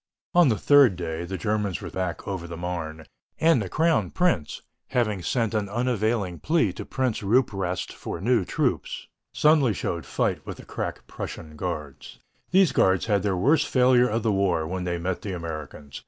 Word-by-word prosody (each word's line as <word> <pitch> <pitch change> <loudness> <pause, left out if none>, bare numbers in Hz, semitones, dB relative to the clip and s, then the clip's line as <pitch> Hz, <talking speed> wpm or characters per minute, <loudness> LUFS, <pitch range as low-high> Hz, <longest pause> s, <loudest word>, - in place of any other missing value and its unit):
On 175 -5 +6
the 110 - +1
third 140 -4 +5
day 85 -1 -4
the 95 +2 -4
Germans 105 -3 -1
were - - -7
thrown 95 0 -2
back 85 -2 -6
over 95 -3 -4
the 85 0 -7
Marne, 80 -3 -5 0.3
and 160 -7 +4
the 95 - -4
crown 165 - +2
prince, 175 - 0 0.2
having 115 -7 0
sent 115 +3 0
an 105 -2 -1
unavailing 110 -5 -1
plea 155 - +1
to - - -7
Prince 130 -4 -1
Rupprecht 100 -5 0
for - - -6
new 115 +2 +2
troops, 90 - -2 0.3
suddenly 150 -6 +4
showed 85 -2 -3
fight - - -1
with - - -7
the - - -12
crack - - -5
Prussian 75 -1 -7
guards. 75 -4 -6 0.3
These 190 -1 +4
guards 95 -1 +3
had 105 -3 +2
their 95 -2 0
worst 145 - +3
failure 125 -1 +4
of 110 +1 -1
the 110 - +2
war 95 -5 +1
when 90 +2 -4
they 85 0 -1
met 90 +2 -3
the 100 - -4
Americans. 80 -4 -7
100 Hz, 185 wpm, -25 LUFS, 85-125 Hz, 0.3 s, On